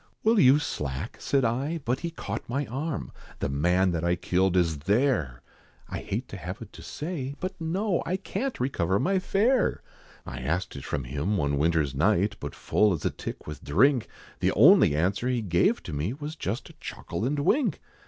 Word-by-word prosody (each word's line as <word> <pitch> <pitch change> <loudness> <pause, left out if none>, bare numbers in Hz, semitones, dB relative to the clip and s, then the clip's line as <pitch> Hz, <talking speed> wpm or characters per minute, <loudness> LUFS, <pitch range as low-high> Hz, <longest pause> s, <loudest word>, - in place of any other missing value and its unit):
"Will 225 0 +4
you 135 -1 +7
slack?" 75 - -4
said 135 -3 +1
I, 135 +8 0
but 125 +2 0
he 170 - -3
caught 115 -10 -6
my 140 +4 -1
arm 140 +6 -4 0.3
"The - - -2
man 90 +7 +2
that 85 -1 -2
I 85 0 +2
killed 90 +1 +1
is 80 -4 +2
there! 95 - +1 0.5
I - - -4
hate 115 +6 -4
to 100 - -7
have 90 +3 -6
it 110 -3 -11
to - - -11
say. 145 -4 -5
But 185 +1 -3
no, 180 +4 0
I 185 - -1
can't 255 +7 -3
recover 95 -8 +1
my 190 - +2
fare! 225 +7 +2 0.4
I 60 - -6
asked 85 +8 -2
it 70 - -7
from 70 - -2
him 75 +11 -1
one 70 -4 0
winter's 80 -3 +2
night, 100 +7 +2
But 70 -1 -6
full 105 -2 +2
as 80 - -4
a - - +2
tick - - -7
with 75 - -8
drink, 125 - +3 0.3
The - - +2
only 75 - +7
answer 95 +9 0
he 125 -1 +1
gave 85 -3 +2
to - - -6
me, 75 +10 -1
Was 150 +3 -6
just 110 -7 -4
a - - -21
chuckle - - -5
and 140 +5 0
wink. 240 - +2
105 Hz, 195 wpm, -27 LUFS, -, 0.5 s, you